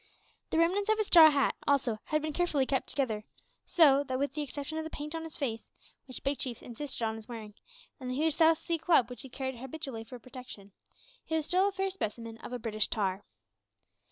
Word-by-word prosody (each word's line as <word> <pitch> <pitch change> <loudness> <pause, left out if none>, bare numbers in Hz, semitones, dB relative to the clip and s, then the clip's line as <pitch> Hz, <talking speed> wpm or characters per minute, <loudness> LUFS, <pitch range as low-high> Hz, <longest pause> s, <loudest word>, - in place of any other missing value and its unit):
The - - 0
remnants 370 +5 +2
of 435 - +4
his 430 - +1
straw 330 -4 +9
hat, 280 -3 +2
also, 260 -6 +2
had 305 -1 0
been 310 -1 -2
carefully 300 -5 +1
kept 265 -1 0
together, 225 -7 -1 0.4
so 285 -4 +6
that, 260 -1 -2
with 280 0 -1
the 300 - -2
exception 290 +2 -4
of - - -3
the 320 - -5
paint 300 0 -6
on 325 - -3
his 325 -1 -7
face, 230 -5 -3 0.4
which 255 - -8
Big 275 0 0
Chief 245 -4 -3
insisted 255 +1 -6
on 220 0 -1
his 220 0 -11
wearing, 220 -4 -8 0.5
and 255 -2 -5
the 255 - -2
huge 310 +3 +2
South 320 +1 +5
Sea 335 0 -2
club 310 -7 +3
which 250 - -8
he 265 - -10
carried 265 0 -4
habitually 265 -2 -6
for 245 +3 -10
protection, 245 -5 -10 0.5
he 320 - -2
was 315 -2 0
still 370 +4 +3
a - - 0
fair 385 0 -1
specimen 230 - -5
of - - -8
a 250 - -2
British 215 -3 0
tar. 195 -2 -1
275 Hz, 220 wpm, -31 LUFS, 235-320 Hz, 0.5 s, straw